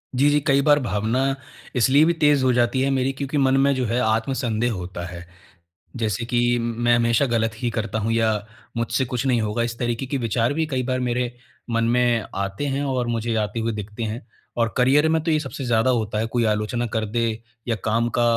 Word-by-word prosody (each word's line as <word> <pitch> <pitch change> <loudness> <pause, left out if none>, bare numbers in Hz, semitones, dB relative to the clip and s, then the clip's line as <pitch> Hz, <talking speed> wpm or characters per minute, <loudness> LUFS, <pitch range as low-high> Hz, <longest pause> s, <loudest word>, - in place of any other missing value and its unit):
जी, 140 +3 +4
जी। 145 0 +3
कई 140 -1 +4
बार 145 0 +4
भावना 120 +4 0 0.4
इसलिए 135 +5 +5
भी 170 - +3
तेज़ 150 -4 +3
हो 130 - +4
जाती 120 +2 +2
है 135 - +2
मेरी 135 0 +1
क्योंकि 140 +2 -3
मन 135 -1 +3
में 140 0 +3
जो 130 -1 -1
है 120 +2 0
आत्म-संदेह 115 +1 0
होता 90 -2 -6
है। 85 0 -8 0.7
जैसे 110 -2 -1
कि 120 0 +2
मैं 120 +1 +1
हमेशा 115 +3 +2
गलत 115 -2 +1
ही 120 - +1
करता 110 -1 -2
हूँ 110 +1 -1
या 115 -1 +2 0.5
मुझसे 115 +2 0
कुछ 125 0 -3
नहीं 125 -3 +2
होगा, 105 +2 -1
इस 120 0 -3
तरीके 120 +2 -2
के 140 - -2
विचार 115 +1 0
भी 160 +1 0
कई 130 -4 -1
बार 130 0 -1
मेरे 125 0 -1 0.4
मन 115 0 +1
में 120 -1 +2
आते 100 +7 -3
हैं 140 0 -1
और 130 -3 -1
मुझे 115 0 -1
आते 105 +1 -1
हुए 115 +1 -1
दिखते 105 +1 -6
हैं 110 +1 -4 0.3
और 115 -1 0
करियर 140 +5 +4
में 160 -1 +1
तो 165 - -1
ये 155 - +3
सबसे 135 -1 -6
ज़्यादा 120 0 +2
होता 110 -3 -1
है, 110 - 0
कोई 120 +1 0
आलोचना 110 +3 0
कर 110 -1 0
दे 115 +2 0 0.4
या 115 - +2
काम 115 +2 +1
का - - +4
120 Hz, 220 wpm, -23 LUFS, 115-130 Hz, 0.7 s, इसलिए